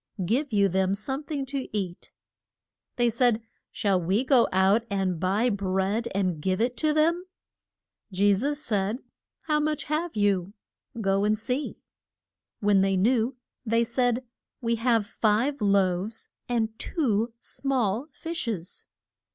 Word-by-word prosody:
Give 260 Hz, -, 0 dB
you 200 Hz, -2 st, +4 dB
them 190 Hz, +1 st, +1 dB
some 265 Hz, +7 st, -3 dB
thing 285 Hz, -2 st, -3 dB
to 270 Hz, 0 st, -4 dB
eat. 180 Hz, -3 st, -5 dB, 0.9 s
They 240 Hz, -1 st, +2 dB
said, 235 Hz, -1 st, +2 dB, 0.3 s
Shall 195 Hz, -3 st, +1 dB
we 190 Hz, +8 st, +1 dB
go 260 Hz, -3 st, +4 dB
out 190 Hz, +4 st, +4 dB
and 190 Hz, -4 st, -1 dB
buy 205 Hz, +7 st, +1 dB
bread 200 Hz, +3 st, 0 dB
and 185 Hz, -6 st, 0 dB
give 185 Hz, +3 st, 0 dB
it 245 Hz, +2 st, +1 dB
to 310 Hz, -1 st, +2 dB
them? 330 Hz, +4 st, +2 dB, 0.9 s
Je 200 Hz, +2 st, +4 dB
sus 280 Hz, +9 st, -1 dB
said, 210 Hz, -4 st, 0 dB, 0.4 s
How 300 Hz, -1 st, +1 dB
much 305 Hz, 0 st, -1 dB
have 315 Hz, +3 st, -2 dB
you? 200 Hz, -2 st, +1 dB, 0.5 s
Go 195 Hz, -1 st, +1 dB
and 215 Hz, +1 st, +2 dB
see. 250 Hz, +6 st, -3 dB, 0.8 s
When 205 Hz, -2 st, +4 dB
they 195 Hz, 0 st, +2 dB
knew 235 Hz, +5 st, +2 dB, 0.3 s
they 230 Hz, 0 st, +2 dB
said, 245 Hz, +1 st, 0 dB, 0.3 s
We 230 Hz, -1 st, 0 dB
have 230 Hz, -2 st, +2 dB
five 225 Hz, +6 st, +1 dB
loaves 200 Hz, +1 st, +1 dB, 0.2 s
and 225 Hz, -2 st, -1 dB
two 230 Hz, -, 0 dB
small 250 Hz, -2 st, -1 dB
fish 330 Hz, -2 st, -5 dB
es. 185 Hz, -6 st, -5 dB
220 Hz, 140 wpm, -27 LUFS, 195-255 Hz, 0.9 s, you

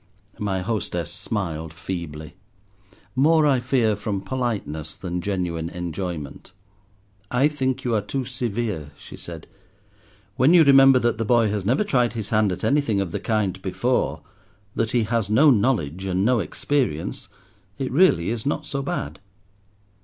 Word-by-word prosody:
My 95 Hz, -3 st, -1 dB
hostess 90 Hz, -5 st, -3 dB
smiled 80 Hz, -6 st, -4 dB
feebly; 80 Hz, -4 st, -6 dB, 0.8 s
more, 155 Hz, +4 st, +4 dB
I 135 Hz, -3 st, +3 dB
fear, 120 Hz, -4 st, +1 dB
from 105 Hz, -1 st, -3 dB
politeness 100 Hz, -, -3 dB
than 90 Hz, -1 st, -4 dB
genuine 85 Hz, -4 st, -2 dB
enjoyment. 90 Hz, -3 st, -6 dB, 0.8 s
"I 125 Hz, +4 st, +3 dB
think 130 Hz, -4 st, -2 dB
you 120 Hz, -, 0 dB
are 110 Hz, -, +2 dB
too 135 Hz, +4 st, -3 dB
severe," 110 Hz, -, -3 dB
she -, -, -11 dB
said. -, -, -9 dB, 0.9 s
"When 150 Hz, +7 st, +5 dB
you 170 Hz, -, +8 dB
remember 135 Hz, -2 st, +7 dB
that 120 Hz, -2 st, 0 dB
the -, -, +1 dB
boy 115 Hz, -1 st, +3 dB
has 100 Hz, -2 st, -2 dB
never 130 Hz, -, +3 dB
tried 125 Hz, -, +1 dB
his 110 Hz, -4 st, -4 dB
hand 105 Hz, -2 st, +2 dB
at 90 Hz, 0 st, -5 dB
anything 140 Hz, -8 st, +2 dB
of 95 Hz, -4 st, -2 dB
the -, -, -3 dB
kind 105 Hz, -4 st, -1 dB
before, -, -, -1 dB, 0.5 s
that 115 Hz, -, 0 dB
he 120 Hz, -1 st, +2 dB
has 115 Hz, -2 st, -1 dB
no 140 Hz, +8 st, +6 dB
knowledge 100 Hz, -, +1 dB
and 95 Hz, +1 st, 0 dB
no 125 Hz, 0 st, +3 dB
experience, 100 Hz, -, -2 dB, 0.5 s
it 135 Hz, -, -3 dB
really 130 Hz, -, +4 dB
is 115 Hz, -2 st, -3 dB
not 145 Hz, +1 st, -2 dB
so 140 Hz, -1 st, -3 dB
bad." 75 Hz, -, -4 dB
110 Hz, 155 wpm, -23 LUFS, 90-130 Hz, 0.9 s, you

